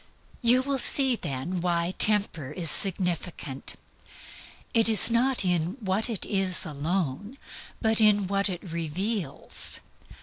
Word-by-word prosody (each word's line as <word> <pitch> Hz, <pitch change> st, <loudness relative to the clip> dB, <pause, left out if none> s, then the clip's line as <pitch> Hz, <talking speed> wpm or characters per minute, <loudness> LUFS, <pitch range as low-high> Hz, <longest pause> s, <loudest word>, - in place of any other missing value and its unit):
You 245 Hz, +2 st, +3 dB
will 275 Hz, 0 st, -2 dB
see 265 Hz, 0 st, +1 dB
then 170 Hz, -, -5 dB
why 170 Hz, 0 st, -1 dB
Temper 200 Hz, -10 st, +3 dB
is 160 Hz, +1 st, +2 dB
significant. 175 Hz, -7 st, -1 dB, 1.0 s
It 225 Hz, -1 st, +5 dB
is 225 Hz, +1 st, +4 dB
not 245 Hz, -2 st, +1 dB
in 175 Hz, +3 st, -1 dB
what 205 Hz, +1 st, -1 dB
it 220 Hz, -5 st, -3 dB
is 190 Hz, -3 st, +4 dB
alone, 170 Hz, -, -4 dB, 0.5 s
but 220 Hz, 0 st, +3 dB
in 205 Hz, -2 st, +4 dB
what 200 Hz, +2 st, -1 dB
it 180 Hz, -2 st, -6 dB
reveals. 170 Hz, 0 st, -3 dB
190 Hz, 125 wpm, -25 LUFS, 170-220 Hz, 1.0 s, It